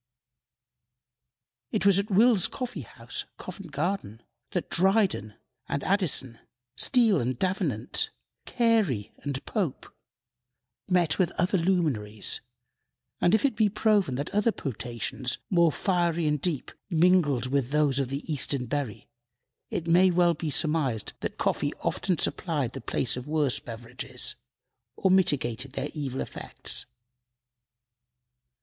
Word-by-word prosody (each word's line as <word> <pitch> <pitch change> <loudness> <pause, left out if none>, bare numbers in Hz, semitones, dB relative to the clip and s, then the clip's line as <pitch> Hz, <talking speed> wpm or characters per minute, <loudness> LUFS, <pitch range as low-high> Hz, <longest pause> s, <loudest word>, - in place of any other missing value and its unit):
It 215 - -1
was 200 -1 +6
at 200 +2 -2
Will's 210 -1 +5
Coffee 250 -1 -5
house, - - -7
Covent 195 -5 -9
Garden, 140 - -3 0.3
that - - -2
Dryden 190 - +2 0.3
and 140 - -2
Addison, 150 - +2 0.4
Steele 230 - +4
and 125 +1 -2
Davenant, 180 - 0 0.4
Carey 215 - +1
and 140 -2 -4
Pope, 185 - -3 0.9
met 175 -3 +2
with 180 -2 +2
other 185 +1 +1
luminaries, 145 - 0 0.8
and 175 - +4
if 220 - +2
it 265 - +1
be 210 -1 +3
proven 205 - +2
that 140 +3 -4
other 210 +3 +2
potations, 125 - -3
more 170 -3 +5
fiery 170 -2 0
and 150 -2 +1
deep, 160 -6 -2 0.2
mingled 165 -7 +3
with 130 -1 0
those 145 -2 +2
of 135 -3 -1
the 140 +2 -4
Eastern 135 -2 +1
berry, 135 -4 -4 0.6
it 165 - -3
may 175 +3 +5
well 175 -1 +4
be 160 0 -4
surmised 150 -8 0
that - - -4
coffee - - 0
often 185 -3 0
supplied 145 -7 0
the - - -6
place 120 +2 0
of 125 +1 -7
worse 150 -4 +1
beverages, 115 0 -4 0.6
or 190 - +2
mitigated 135 -8 +1
their 145 +1 -3
evil 135 -4 -3
effects. - - -4
160 Hz, 125 wpm, -27 LUFS, 130-190 Hz, 0.9 s, was